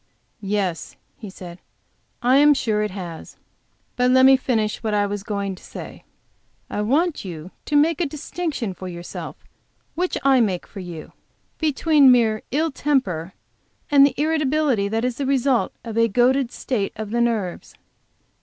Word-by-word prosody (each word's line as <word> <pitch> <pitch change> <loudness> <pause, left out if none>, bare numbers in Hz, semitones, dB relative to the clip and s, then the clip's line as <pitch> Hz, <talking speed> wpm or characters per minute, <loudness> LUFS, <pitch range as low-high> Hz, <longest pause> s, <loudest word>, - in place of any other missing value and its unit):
"Yes," 195 -4 -2 0.2
he 215 - -8
said, 180 -2 -10 0.6
"I 255 +2 +5
am 295 +1 +6
sure 215 -5 0
it 210 - -1
has. 180 -4 -8 0.6
But 250 0 +2
let 260 +1 +6
me 270 0 +8
finish 225 -5 -1
what 215 -2 -1
I 205 0 +2
was 205 0 -4
going 200 -1 -3
to 185 - -14
say. - - -10 0.7
I 210 - -2
want 295 +10 +1
you 175 -2 -8
to 295 - -2
make 310 +3 +3
a 335 - +1
distinction 295 - -4
for 185 +1 -8
yourself, 175 -1 -7 0.6
which 360 +2 -1
I 270 -2 +5
make 190 -6 -1
for 200 - -11
you, 175 -4 -8 0.5
between 300 -2 +4
mere 225 -3 +3
ill 315 +4 0
temper, 245 - -1 0.6
and 280 -1 +7
the 280 - +2
irritability 300 -7 +1
that 225 +3 -1
is 250 -1 -2
the 275 - -2
result 270 -2 +1
of 225 -2 -6
a 230 - +4
goaded 250 +3 +2
state 215 -7 -3
of 215 -1 -6
the 235 +1 +1
nerves. 220 -7 -2
235 Hz, 165 wpm, -22 LUFS, 200-275 Hz, 0.7 s, me